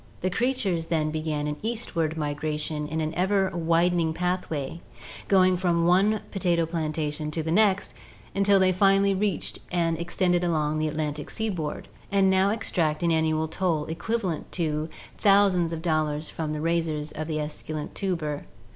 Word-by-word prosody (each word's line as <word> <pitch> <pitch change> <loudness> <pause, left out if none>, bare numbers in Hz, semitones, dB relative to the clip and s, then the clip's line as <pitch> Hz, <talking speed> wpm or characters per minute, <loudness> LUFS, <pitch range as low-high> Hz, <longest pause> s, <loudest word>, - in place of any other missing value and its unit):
The 185 - 0
creatures 220 -9 0
then 155 -2 0
began 155 -1 -2
an 150 0 -3
eastward 170 -9 -2
migration 150 0 -2
in 160 +1 -2
an 155 +1 -2
ever 190 +2 +1
widening 170 0 +2
pathway, 170 -4 -2 0.5
going 185 -2 +4
from 170 -2 +1
one 195 +5 +3
potato 175 -4 +1
plantation 155 -2 -2
to 160 +1 -2
the 160 - -2
next, 200 +1 +3 0.4
until 200 0 +4
they 185 0 +4
finally 195 +1 +4
reached 195 -3 -1
and 165 -2 +1
extended 175 +1 +1
along 155 -3 0
the 155 - +1
Atlantic 150 -1 -3
seaboard 185 -9 -3 0.2
and 195 -1 +4
now 190 +1 +4
extract 170 -8 0
an 170 - +3
annual 160 0 +1
toll 160 -2 0
equivalent 185 0 -3
to 155 -2 -1 0.3
thousands 195 -4 +4
of 165 -1 -5
dollars 155 -2 0
from 155 -2 -4
the 150 - -3
raisers 160 -2 -1
of 155 0 -5
the 155 -1 -2
esculent 150 0 -5
tuber. 160 -7 -2
165 Hz, 155 wpm, -26 LUFS, 155-185 Hz, 0.5 s, going